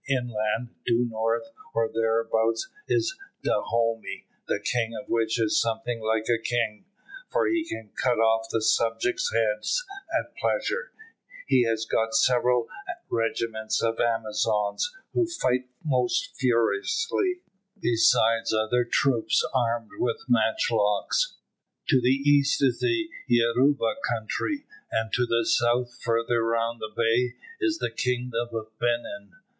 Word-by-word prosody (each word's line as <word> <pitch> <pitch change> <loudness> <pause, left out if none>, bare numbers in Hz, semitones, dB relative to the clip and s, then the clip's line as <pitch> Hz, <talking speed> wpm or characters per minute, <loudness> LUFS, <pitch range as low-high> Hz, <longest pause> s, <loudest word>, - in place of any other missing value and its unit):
Inland, 120 -2 -1
due 120 +1 +2
north, 115 +3 -1 0.2
or 115 0 +2
thereabouts, 115 - 0 0.2
is 380 -1 +1 0.3
Dahomey, 115 -1 -1 0.2
the - - 0
king 115 -2 -1
of 130 - -11
which 115 0 0
is 110 -2 +3
something 115 +1 -2
like 110 0 0
a 115 -1 +1
king, 115 -3 -1 0.4
for - - +1
he 340 -4 +1
can 110 -2 -7
cut 125 -2 +1
off 115 0 +2
his 110 0 +3
subjects' 115 +1 0
heads 115 - 0 0.3
at - - -2
pleasure; - - -1 0.5
he 125 - +4
has 115 -1 0
got 110 0 0
several 125 0 +3 0.4
regiments 115 -1 -1
of 115 0 0
Amazons, 110 - 0 0.2
who 355 - +2
fight 130 - -1 0.2
most 125 -4 0
furiously, 365 - +1 0.4
besides 115 - +3
other 110 +3 +2
troops 120 0 +2
armed 120 -3 0
with 415 +6 0
matchlocks. - - +1 0.5
To 130 -4 +5
the 125 - +3 0.2
east 145 -1 +4
is 125 -3 +2
the 340 -2 +1 0.2
Yoruba 125 - +3
country, 120 - -2 0.3
and 110 0 -1
to 125 -1 +2
the 115 -1 +1
south, 120 +1 +1
further 115 0 +1
round 115 0 0
the 110 - -4
bay, 115 +3 +1 0.2
is 335 -5 +1
the 115 - -2
kingdom 120 0 -1
of 110 -1 -6
Benin. 120 -4 -2
115 Hz, 130 wpm, -26 LUFS, 115-125 Hz, 0.5 s, To